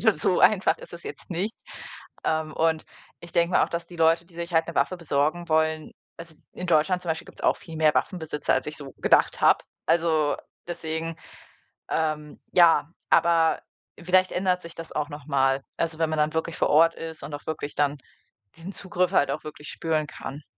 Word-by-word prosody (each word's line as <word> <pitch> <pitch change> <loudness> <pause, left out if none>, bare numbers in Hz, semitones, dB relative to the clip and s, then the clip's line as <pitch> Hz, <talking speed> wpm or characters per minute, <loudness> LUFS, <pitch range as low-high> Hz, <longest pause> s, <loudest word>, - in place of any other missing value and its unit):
Also, - - +4
so - - +2
einfach - - +4
ist - - -12
es - - -8
jetzt 430 - -7
nicht. 190 +6 -1 0.7
Ähm, 155 -1 0
und 160 -1 +1 0.4
ich 170 - -12
denke 170 0 +2
mir - - +5
auch, - - -8
dass 170 0 -3
die 175 - -12
Leute, 165 +1 +3
die 170 - -22
sich 170 +1 -6
halt 165 0 +3
'ne 170 - -5
Waffe 185 - +1
besorgen 165 +2 0
wollen 160 0 +1 0.3
also, 165 -1 -10 0.2
in 180 - -6
Deutschland 175 +3 +3
zum 175 - -6
Beispiel 160 +2 -3
gibt's - - -12
auch - - +3
viel 165 -5 -10
mehr 155 -1 +4
Waffenbesitzer, 160 -5 0
als - - -1
ich 150 - -5
so 140 -2 -6
gedacht - - +3
habe. - - +4 0.2
Also 160 -3 +2 0.3
deswegen, 160 -1 -3 0.7
ähm, 155 -2 -2
ja 165 -3 +5 0.2
aber 165 -1 +4 0.4
vielleicht 185 +1 +3
ändert 180 -1 +1
sich 170 0 -10
das 165 0 -8
auch 150 -1 -2
noch 145 -1 -9
mal. 135 0 +2
Also, 165 -1 -1
wenn 160 -1 +2
man 155 -1 -1
dann 150 +1 +2
wirklich 160 +1 -2
vor - - +1
Ort 165 +2 +5
ist 160 -1 -7
und 145 - -7
auch 145 - -7
wirklich 150 -2 -4
dann 145 0 +1 0.6
diesen 175 +4 -7
Zugriff 180 -1 -1
halt 140 -6 +3
auch 150 +2 -4
wirklich 150 0 -8
spüren 155 -2 -1
kann. 145 0 -8
160 Hz, 200 wpm, -26 LUFS, 155-170 Hz, 0.7 s, mir